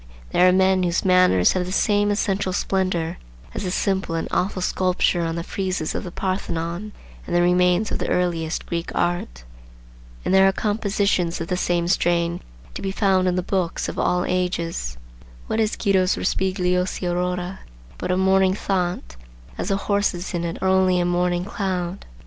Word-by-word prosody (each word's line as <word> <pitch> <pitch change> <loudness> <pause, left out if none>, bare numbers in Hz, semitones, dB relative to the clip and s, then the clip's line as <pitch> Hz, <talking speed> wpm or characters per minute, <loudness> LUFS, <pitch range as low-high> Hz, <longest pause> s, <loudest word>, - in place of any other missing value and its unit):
There 180 - +5
are - - +5
men 190 0 +3
whose 175 0 0
manners 180 - +5
have 180 -1 -1
the - - -4
same 205 +1 +2
essential 200 -2 0
splendor 185 -4 -1 0.3
as - - -4
the - - -1
simple 190 -2 -1
and 165 - -2
awful 185 0 0
sculpture 185 -1 +1
on 165 -1 -2
the 170 - -3
friezes 185 -3 -2
of - - -3
the 180 - -6
Parthenon 185 +1 -3 0.4
and 175 - -2
the 175 - +4
remains 180 +3 +3
of - - -2
the - - -2
earliest 170 -3 -1
Greek 170 -1 -3
art. 175 - -1 0.8
And - - +1
there 190 0 +6
are - - +4
compositions 200 -4 0
of 165 - -5
the 180 - +1
same 175 -1 0
strain 170 -1 +1 0.3
to - - -6
be 195 - -2
found 190 -2 +2
in 180 - +1
the 180 - -1
books 185 -2 -1
of - - -5
all 180 0 +1
ages. 170 - -2 0.5
What 220 - -2
is 220 -1 +1
Guido's 190 -3 +2
Rospigliosi 180 -1 0
Aurora 180 +1 -2 0.4
but - - -4
a 180 - +2
morning 190 0 +3
thought, 180 - -2 0.4
as - - -4
the 195 - +1
horses 200 -3 -1
in 170 -1 -1
it 170 -1 -3
are - - +2
only 185 -1 +3
a 175 - +1
morning 175 0 0
cloud? 190 -3 -3
180 Hz, 180 wpm, -22 LUFS, 175-190 Hz, 0.8 s, there